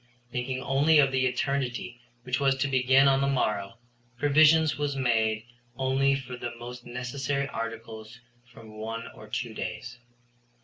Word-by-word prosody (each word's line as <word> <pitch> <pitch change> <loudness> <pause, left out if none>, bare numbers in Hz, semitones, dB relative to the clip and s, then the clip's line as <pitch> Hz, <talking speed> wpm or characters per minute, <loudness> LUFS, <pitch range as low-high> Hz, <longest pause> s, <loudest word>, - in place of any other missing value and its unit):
Thinking 130 +1 -3
only 145 +4 +3
of 135 -2 +5
the 130 -1 +2
eternity 125 -2 -2 0.2
which 125 +1 -1
was 135 -1 +3
to 135 - 0
begin 130 +1 +4
on 135 0 +4
the 140 - +2
morrow, 110 -5 -1 0.4
provision 155 +3 +5
was 145 -1 -1
made 110 -4 +1 0.3
only 135 +1 +2
for 130 -2 -6
the 120 -1 -6
most 120 +1 -9
necessary 135 +3 -2
articles 115 -1 -7 0.3
for 115 -1 -14
one 110 +2 -6
or 110 - -13
two 115 +2 -4
days. 125 +2 -6
125 Hz, 145 wpm, -27 LUFS, 115-135 Hz, 0.4 s, of